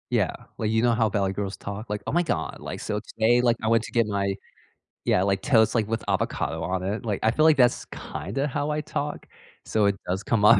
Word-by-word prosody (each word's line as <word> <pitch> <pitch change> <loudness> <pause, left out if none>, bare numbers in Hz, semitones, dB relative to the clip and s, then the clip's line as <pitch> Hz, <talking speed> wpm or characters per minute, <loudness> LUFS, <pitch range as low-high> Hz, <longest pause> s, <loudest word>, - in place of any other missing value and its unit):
Yeah, - - +2 0.3
like, 110 - -1
you 110 0 +2
know 120 - +4
how 110 -1 +2
valley 100 -1 0
girls 100 0 -3
talk? 100 +3 -7
Like, 105 0 -3
"Oh - - -2
my 175 - +3
god, 170 - -2
like, - - -6
so 105 - -2
today, 115 +3 +2
like, 120 -1 +3
I 110 - +1
went 115 -1 +4
to - - -10
get 115 -1 +3
my" 100 -1 0 0.7
yeah, 90 - +3
"Like, 95 -1 +1
toast, 110 -4 +4
like, 110 -3 +1
with 115 0 -2
avocado 80 - -1
on 90 +2 -2
it." 100 +4 -2
Like, 105 -4 -1
I 110 - +4
feel 155 +6 +2
like 160 -1 +6
that's, 125 -2 +3
kinda 100 - -4
how 145 +1 -2
I 150 0 0
talk? 150 -1 -4 0.4
So, 110 -2 +2
it 100 -1 +3
does 95 +2 -1
come 105 -1 +1
up. 115 +2 +8
110 Hz, 245 wpm, -25 LUFS, 100-120 Hz, 0.7 s, up